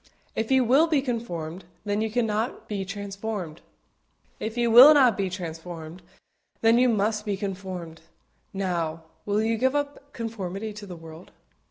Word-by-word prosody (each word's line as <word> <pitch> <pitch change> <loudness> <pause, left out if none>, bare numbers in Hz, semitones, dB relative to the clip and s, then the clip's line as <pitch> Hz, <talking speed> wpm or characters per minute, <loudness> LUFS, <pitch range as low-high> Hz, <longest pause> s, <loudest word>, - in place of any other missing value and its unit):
If 220 - -2
you 265 -1 +4
will 275 +8 +5
be 300 -5 +2
conformed, 185 - -4 0.2
then 205 +1 0
you 220 - 0
cannot 225 +1 -1
be 200 -2 -3
transformed; 195 -3 -5 0.8
if 220 +2 -4
you 235 -1 +2
will 260 +6 +10
not 255 -7 +5
be 195 -1 -1
transformed, 170 -1 -7 0.6
then 230 +1 +5
you 250 0 +4
must 215 -1 +1
be 205 -2 -2
conformed. 185 -4 -6 0.5
Now, 170 -4 -2 0.2
will 205 +1 +1
you 225 0 0
give 260 +3 +2
up 285 0 -3
conformity 215 -3 -5
to 205 0 -9
the 180 - -7
world? 165 +1 -12
210 Hz, 155 wpm, -26 LUFS, 180-230 Hz, 0.8 s, will